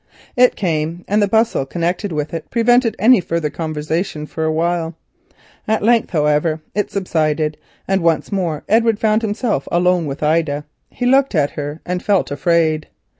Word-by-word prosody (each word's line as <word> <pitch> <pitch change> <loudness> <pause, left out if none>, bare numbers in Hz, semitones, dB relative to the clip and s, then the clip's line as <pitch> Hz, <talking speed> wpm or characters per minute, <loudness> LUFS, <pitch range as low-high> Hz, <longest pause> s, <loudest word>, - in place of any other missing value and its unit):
It 250 0 +4
came, 165 -1 -2
and 210 +2 +2
the 205 - +3
bustle 220 -6 +2
connected 175 +7 -2
with 150 0 -3
it 165 -2 -5
prevented 240 0 +3
any 225 +1 +5
further 165 -3 -2
conversation 155 0 -3
for 160 +1 -4
a 160 - +1
while. 165 0 -1 0.7
At 220 -1 0
length, 230 0 +3
however, 150 0 +1
it 205 -1 -1
subsided, 155 -5 -1 0.3
and 195 -1 +1
once 165 +2 +1
more 170 -6 -2
Edward 225 0 +3
found 215 0 +2
himself 215 - -1
alone 175 -1 +2
with 140 +2 -5
Ida. 150 -2 0 0.2
He 245 - -4
looked 270 -2 +3
at 145 -2 +2
her 145 +2 -6
and 180 0 -2
felt 200 -7 +1
afraid. 155 +1 +1
170 Hz, 165 wpm, -18 LUFS, 155-210 Hz, 0.7 s, any